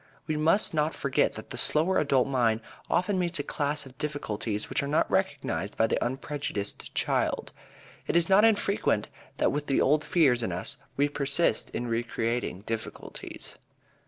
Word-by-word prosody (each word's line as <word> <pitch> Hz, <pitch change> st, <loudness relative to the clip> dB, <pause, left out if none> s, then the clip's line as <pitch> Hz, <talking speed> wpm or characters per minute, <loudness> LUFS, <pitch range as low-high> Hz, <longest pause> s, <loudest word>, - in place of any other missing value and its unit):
We 155 Hz, 0 st, -1 dB
must 160 Hz, +7 st, +3 dB
not 155 Hz, 0 st, +1 dB
forget 140 Hz, -1 st, +1 dB
that -, -, -9 dB
the -, -, -3 dB
slower 165 Hz, +5 st, +2 dB
adult 135 Hz, -4 st, +2 dB
mind 120 Hz, -4 st, +2 dB, 0.3 s
often 185 Hz, +3 st, +1 dB
meets 175 Hz, -1 st, +1 dB
a 145 Hz, -, -2 dB
class 145 Hz, 0 st, -1 dB
of 130 Hz, 0 st, -15 dB
difficulties 110 Hz, -8 st, -3 dB
which -, -, -1 dB
are 140 Hz, -, -3 dB
not 150 Hz, -, +1 dB
recognized 95 Hz, +6 st, -1 dB
by 110 Hz, -, +4 dB
the 115 Hz, -, 0 dB
unprejudiced 130 Hz, -5 st, -4 dB
child. -, -, 0 dB, 0.6 s
It -, -, -1 dB
is 170 Hz, -1 st, +4 dB
not 195 Hz, +2 st, +6 dB
infrequent 200 Hz, -, +2 dB, 0.3 s
that -, -, +2 dB
with 145 Hz, 0 st, -3 dB
the 135 Hz, -, +2 dB
old 150 Hz, +2 st, +3 dB
fears 135 Hz, -8 st, +3 dB
in 115 Hz, -, -2 dB
us 90 Hz, +11 st, -1 dB, 0.2 s
we 145 Hz, +1 st, +3 dB
persist 140 Hz, -2 st, +1 dB
in 120 Hz, -, -4 dB
recreating 115 Hz, -3 st, -2 dB
difficulties. 110 Hz, +1 st, -6 dB
140 Hz, 165 wpm, -28 LUFS, 115-155 Hz, 0.6 s, not